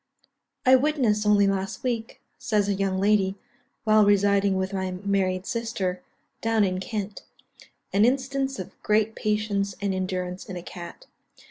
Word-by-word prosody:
"I 260 +1 +8
witnessed, 250 -7 +1
only 205 -1 +5
last 195 -1 -2
week," 235 -3 -3 0.2
says 210 -2 +1
a 205 - +2
young 195 -1 -1
lady, 195 -1 +2 0.5
"while 215 -1 +5
residing 200 -1 +3
with 190 +1 -2
my 190 -1 -1
married 185 0 -1
sister, 215 -7 -2 0.4
down 225 -1 +2
in 185 -1 0
Kent, 205 +1 -4 0.7
an 200 +2 +4
instance 270 +2 +1
of 185 - -9
great 215 +1 +2
patience 210 -3 -1
and 200 -1 -1
endurance 185 -1 -3
in 190 - -6
a 175 - -7
cat. 175 - -9
200 Hz, 145 wpm, -25 LUFS, 190-220 Hz, 0.7 s, I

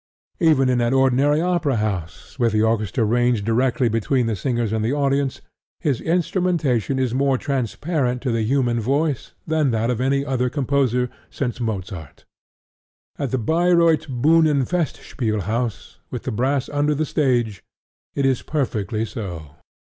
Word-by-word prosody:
Even 155 -7 +4
in 125 -1 +2
an 120 +2 +1
ordinary 135 +3 +3
opera 170 -6 +1
house, 105 - -4
with 115 -3 +2
the 110 0 +3
orchestra 110 0 +1
ranged 120 -1 +1
directly 120 +2 +2
between 115 +3 +1
the 115 -1 -1
singers 120 +1 -1
and 110 -1 0
the 115 - 0
audience, 140 -1 0 0.4
his 145 -8 -1
instrumentation 165 - 0
is 130 -3 0
more 135 0 +2
transparent 135 - -1
to 130 - 0
the 115 -1 0
human 120 0 +1
voice 140 +4 -1
than 155 -3 +1
that 115 +1 0
of 120 0 -2
any 140 +1 +1
other 125 -2 0
composer 130 -3 +1 0.2
since 125 -3 -3
Mozart. 95 - -5 0.9
At 140 - -1
the 130 - 0
Bayreuth 165 +4 +3
Buhnenfestspielhaus, 130 - 0
with - - -5
the - - -3
brass 130 +4 0
under 145 +1 +1
the 155 +2 0
stage, 120 - 0 0.5
it 140 - +1
is 130 -2 +2
perfectly 110 - -2
so. 85 -9 -7
130 Hz, 145 wpm, -22 LUFS, 115-145 Hz, 0.9 s, Even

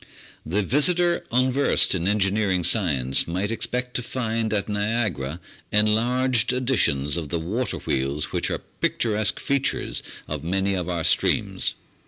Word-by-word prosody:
The 100 +7 -1
visitor 170 - +2
unversed 130 +3 +3
in 90 -1 -1
engineering 100 -2 +1
science 70 - +2
might 95 +5 -2
expect 125 +2 -1
to - - -1
find 115 -3 -2
at 105 -2 +1
Niagara 105 - -1 0.3
enlarged 120 +4 +2
editions 115 - +1
of 80 -4 -4
the 85 - -1
water 105 +10 -3
wheels 70 +3 -2
which - - -1
are - - -3 0.2
picturesque 110 -3 0
features 140 -2 -1 0.3
of - - -5
many 95 +3 0
of 90 -2 -3
our 85 -2 -2
streams. - - +1
105 Hz, 135 wpm, -24 LUFS, 85-125 Hz, 0.3 s, unversed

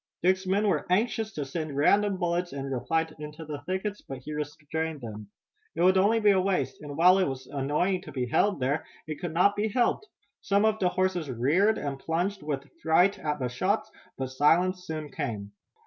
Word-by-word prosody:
Dick's 185 +1 +2
men 200 +3 +2
were 195 - 0
anxious 220 +3 +1
to 145 -5 -3
send 150 0 -4
random 200 +6 +3
bullets 175 -1 -1
in 140 -1 -4
reply 160 +6 0
into 150 +2 -8
the 145 -2 -6
thickets, 195 +3 -2
but 135 - -7
he 140 +4 -8
restrained 150 +1 -4
them. 105 -4 -8 0.5
It 170 - +1
would 185 +1 +6
be 190 - +3
only 210 +1 +4
a 190 -1 +3
waste, 190 0 -1
and 145 -1 -7
while 180 +3 +6
it 185 - +2
was 130 -1 -5
annoying 150 +8 0
to 190 - -10
be 130 -2 -2
held 195 - +2
there, 135 +4 0 0.2
it 155 -1 -6
could 175 -3 -3
not 180 +5 +3
be 210 +1 0
helped. 245 - +1 0.3
Some 200 +1 +2
of 220 0 +2
the 180 - +3
horses 180 -5 0
reared 155 - +2
and 140 -2 -4
plunged 180 +7 -1
with 145 -2 -4
fright 180 +5 +3
at 150 -4 -2
the 130 - -2
shots, 195 - -1 0.3
but 130 -1 -3
silence 180 +7 +2
soon 155 -2 -5
came. 105 -3 -4
165 Hz, 200 wpm, -28 LUFS, 145-190 Hz, 0.5 s, would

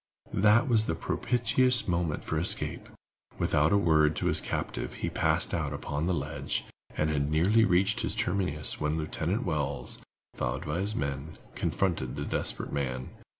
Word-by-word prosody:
That 105 +5 +4
was 110 -3 +3
the 80 - 0
propitious 125 +7 +1
moment 85 -4 -1
for 80 - -1
escape. 85 - 0 0.5
Without 75 +2 +2
a 100 - +5
word 80 -4 +3
to - - -2
his - - +3
captive, - - -3
he - - -3
passed - - +1
out - - -1
upon 75 +4 -3
the 90 - +2
ledge, 75 0 -3 0.3
and 75 0 +1
had 70 -1 0
nearly 95 +9 +4
reached 95 +2 +2
its - - -1
terminus 90 -6 -1
when 75 +1 0
Lieutenant 80 +7 -1
Wells, 75 -7 -2 0.3
followed 65 +2 -3
by 75 +3 -2
his 105 +3 -1
men, 70 +2 -3 0.2
confronted 85 -10 -1
the - - -4
desperate - - -1
man. 65 -3 -2
80 Hz, 160 wpm, -29 LUFS, 75-100 Hz, 0.5 s, a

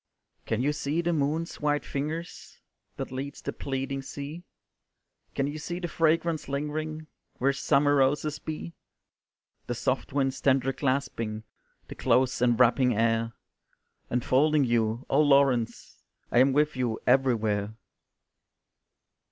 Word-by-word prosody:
"Can 115 +2 0
you 145 +2 +1
see 150 +3 -1
the 170 0 0
moon's 155 +3 -1
white 145 0 0
fingers, 155 +5 -5 0.4
That - - -5
leads 135 +2 -5
the - - -5
pleading 135 0 -3
sea? 145 +5 -7 0.9
Can 135 - +1
you 145 +2 -4
see 175 +3 -4
the 175 - -3
fragrance 165 -1 +1
lingering 155 +2 -3 0.3
Where 140 +2 +2
summer 145 +1 +2
roses 145 +3 +1
be? 160 +2 -6 0.9
The - - -2
soft - - -1
winds 135 -1 0
tender 135 -1 +2
clasping, 130 -6 -2 0.4
The - - -7
close 130 -1 +1
enwrapping 125 +1 +4
air 115 +1 +1 0.8
Enfolding 140 +5 +3
you 115 0 0
Oh, 140 - +3
Laurence, 140 -5 +2 0.3
I 120 - +4
am 135 +2 +5
with 150 +2 +2
you 120 -3 -1
everywhere." 110 -5 +2
140 Hz, 125 wpm, -27 LUFS, 125-150 Hz, 0.9 s, am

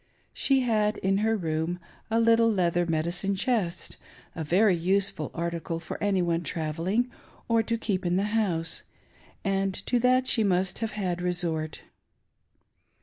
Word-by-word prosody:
She 270 -1 +2
had 215 -3 +1
in 195 +1 +1
her 220 +1 +2
room 165 0 -2 0.3
a 225 +1 +2
little 230 0 +4
leather 175 -3 +1
medicine 170 +5 -1
chest 190 -5 -1 0.2
— - - -25
a 160 - -3
very 185 +5 +4
useful 185 -2 +1
article 170 -1 -3
for 165 - -7
any 195 -3 +2
one 170 -1 0
travelling, 175 +9 -1 0.4
or 230 -1 +3
to 230 +1 -1
keep 200 -4 -2
in 175 0 +1
the 190 - +2
house 175 -7 0 0.3
— - - -29
and 195 -1 +1
to 245 - +1
that 255 +1 +3
she 225 -3 +2
must 185 -2 +1
have 225 -1 -3
had 180 -4 -2
resort. 170 -3 -1
190 Hz, 155 wpm, -27 LUFS, 170-220 Hz, 0.4 s, little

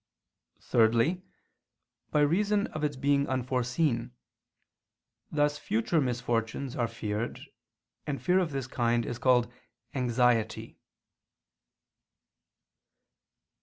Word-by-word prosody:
Thirdly, 115 +10 +2 0.9
by 150 - +2
reason 200 +7 +2
of 155 - -4
its 145 -1 0
being 140 +1 +1
unforeseen: 125 0 -1 1.2
thus 145 -1 +1
future 145 +6 0
misfortunes 120 0 -2
are 120 -2 0
feared, 105 +1 -4 0.7
and 140 -3 -2
fear 180 +10 +3
of 180 -3 0
this 135 -3 -3
kind 120 -2 0
is 120 0 -5
called 125 -2 +3 0.4
_anxiety. 125 -3 +1
125 Hz, 90 wpm, -29 LUFS, 120-145 Hz, 1.2 s, fear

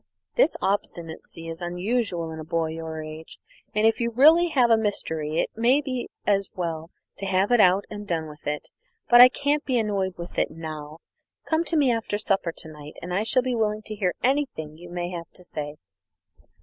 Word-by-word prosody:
This - - +3
obstinacy 165 -4 -3
is 165 +1 -6
unusual 180 -1 -1
in 160 - -7
a - - -5
boy 160 +1 -1
of - - -5
your 160 -1 -5
age, 155 +1 -9 0.4
and 215 +1 +3
if 225 - +3
you 235 - +1
really 310 +9 +6
have 255 -7 +3
a - - +8
mystery 160 -8 -2
it - - 0
may 240 +5 +4
be 260 -4 -4 0.2
as 200 -1 +2
well 165 -2 -3 0.3
to 195 - -3
have 190 +3 +2
it 240 - +5
out 185 +2 +5
and 205 -1 -5
have 205 - -10
done 165 -3 -1
with 150 -1 -11
it. 150 0 -3 0.4
But 240 0 +9
I 250 - +11
can't 285 +3 0
be 255 -2 0
annoyed 200 -4 -1
with 170 0 -5
it - - +2
now. 155 -1 -7 0.5
Come 320 +1 +1
to 330 - 0
me 275 -4 +4
after 225 -3 -1
supper 195 -5 0
to 160 - -9
night, 150 -1 -11
and 180 +1 -6
I 195 - +1
shall 245 +3 +2
be 255 -1 -1
willing 215 -2 0
to 215 - -5
hear 190 -4 0
anything 255 - 0
you 175 +2 -12
may 175 0 -3
have 170 -2 -6
to 180 - -11
say." 150 -4 -5
190 Hz, 215 wpm, -25 LUFS, 165-235 Hz, 0.5 s, I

